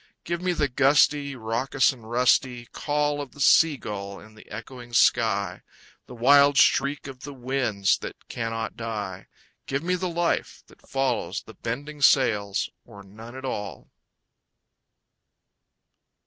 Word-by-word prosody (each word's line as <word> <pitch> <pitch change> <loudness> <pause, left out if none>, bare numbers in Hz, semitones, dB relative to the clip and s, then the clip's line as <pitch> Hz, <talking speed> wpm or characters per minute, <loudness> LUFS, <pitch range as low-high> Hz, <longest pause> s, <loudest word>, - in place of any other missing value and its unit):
Give 170 +1 -3
me 180 0 0
the 150 -3 +1
gusty, 140 +1 +3
Raucous 125 +4 +1
and 115 -4 -14
rusty 125 0 +2
Call 145 +2 -1
of 140 -3 -9
the - - -16
sea 150 +2 +5
gull 100 -4 -6
in 110 - -15
the 110 - -17
echoing 120 +2 -9
sky, 100 -5 +2 0.5
The 125 - -10
wild 140 +3 +5
shriek 140 +3 +3
of 135 -2 -9
the 145 +2 -9
winds 125 -6 0
that - - -9
cannot 115 -1 -4
die, 105 -5 -5 0.4
Give 140 +3 -2
me 180 +1 0
the 180 0 -1
life 170 0 -1
that - - -22
follows 125 -9 -1
the 110 - -13
bending 145 +7 -6
sails, 105 -8 +3 0.2
Or 100 0 -13
none 110 +5 -12
at 130 0 -7
all! 105 -6 -5
125 Hz, 140 wpm, -25 LUFS, 110-140 Hz, 0.5 s, sea